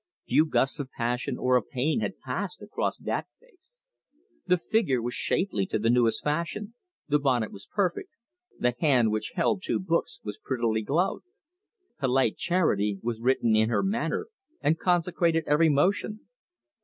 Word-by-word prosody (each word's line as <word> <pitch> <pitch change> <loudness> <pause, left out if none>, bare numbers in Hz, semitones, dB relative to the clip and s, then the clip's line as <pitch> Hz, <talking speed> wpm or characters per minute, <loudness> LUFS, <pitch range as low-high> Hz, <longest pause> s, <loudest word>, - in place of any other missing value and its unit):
Few 155 - +3
gusts 135 -2 +1
of 140 -2 -4
passion 125 +2 -2
or 125 0 +2
of 120 - -4
pain 140 - 0
had - - -3
passed 450 - -5
across - - -2
that - - -3
face. - - -28 0.7
The 180 0 +4
figure 170 - +1
was 120 +1 -3
shapely 145 - 0
to - - -1
the 115 +2 +2
newest 115 -2 +2
fashion, 170 +8 -2 0.3
the 150 -1 +2
bonnet 125 -6 +1
was 100 - -12
perfect, 200 - -1 0.5
the 125 0 +1
hand 125 -8 +3
which 110 0 -3
held 185 +2 +1
two - - 0
books 170 -3 -1
was 105 -1 -6
prettily 115 -4 0
gloved. 170 - 0 0.7
Polite 135 -2 +2
charity 105 - +1
was 115 -1 -3
written 120 -3 +2
in 110 +1 +3
her 120 - +1
manner 210 +5 -1 0.3
and 160 +2 +1
consecrated 170 -2 +1
every 155 +2 +4
motion. 195 +8 +1
145 Hz, 155 wpm, -27 LUFS, 120-180 Hz, 0.7 s, The